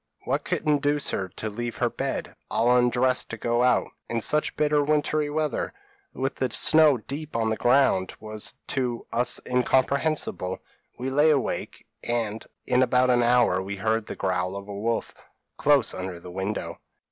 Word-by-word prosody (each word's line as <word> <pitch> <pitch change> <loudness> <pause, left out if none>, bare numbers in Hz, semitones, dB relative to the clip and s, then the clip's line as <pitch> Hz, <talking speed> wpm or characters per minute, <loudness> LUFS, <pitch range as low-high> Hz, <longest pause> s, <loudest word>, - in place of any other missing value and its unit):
p> - - -4
"What - - 0
could - - -2
induce 145 -1 +1
her 95 -1 -2
to 110 - -4
leave 120 +2 -4
her - - +1
bed, - - -3
and - - -18
all 120 +2 +3
undressed 125 +1 +2
to 115 - -5
go 120 +2 0
out, 125 -1 +3 0.2
in 115 - -1
such 150 +7 +1
bitter 150 -1 +2
wintry 150 0 +1
weather, 155 - -2 0.4
with 135 0 -1
the 130 - -1
snow 155 +3 +5
deep 140 +6 -6
on 110 -1 +1
the - - +1
ground 120 -7 +2
was 110 -1 -4
to 125 -3 -2
us 120 +1 +2
incomprehensible; 130 - +1 0.4
we 130 +2 -3
lay 145 +3 +4
awake, 140 -5 -1 0.2
and 115 -2 -2 0.2
in 125 - +2
about 125 0 +3
an 120 0 +3
hour 120 -6 +3
we 100 +1 -5
heard 110 +2 -1
the - - -5
growl 90 0 -1
of 100 0 -7
a 100 - -7
wolf, 115 +3 -2 0.4
close 145 -5 +3
under 95 -1 -5
the 90 +1 -10
window. 95 +3 -4
120 Hz, 175 wpm, -25 LUFS, 110-140 Hz, 0.4 s, snow